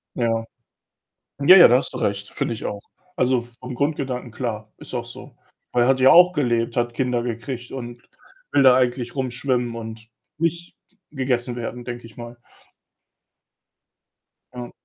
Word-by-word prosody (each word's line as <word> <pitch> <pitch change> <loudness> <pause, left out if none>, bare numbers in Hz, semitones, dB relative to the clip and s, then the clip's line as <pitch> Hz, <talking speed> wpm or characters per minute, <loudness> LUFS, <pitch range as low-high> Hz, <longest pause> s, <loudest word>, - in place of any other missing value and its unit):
Ja. 115 -2 0 1.0
Ja, 165 +7 +8
ja, 175 - +10
da 125 - +5
hast 130 - 0
du 130 - -6
recht, 100 -3 -1
finde - - -2
ich 110 - -9
auch. 100 0 -4 0.3
Also, 125 -1 +2 0.2
vom 125 0 -7
Grundgedanken 135 -3 -2
klar, 110 -3 -5
ist - - -7
auch - - -2
so. - - -11 0.4
Weil, 120 -1 +3
er 125 - +2
hat 130 -1 +3
ja 130 - +7
auch 180 +1 +7
gelebt, 120 -7 0
hat 120 0 0
Kinder 125 -2 0
gekriegt 120 +1 -5
und 120 -2 -7 0.5
will 140 - +4
da 130 -2 +7
eigentlich 125 0 -1
rumschwimmen 125 -2 -1
und 110 0 -8 0.3
nicht 170 +1 -2 0.3
gegessen 125 -3 -2
werden, 120 0 -6
denke 120 -1 -7
ich 115 - -16
mal. 120 0 -9 2.2
Ja. 120 -1 -7
120 Hz, 160 wpm, -22 LUFS, 120-130 Hz, 2.2 s, ja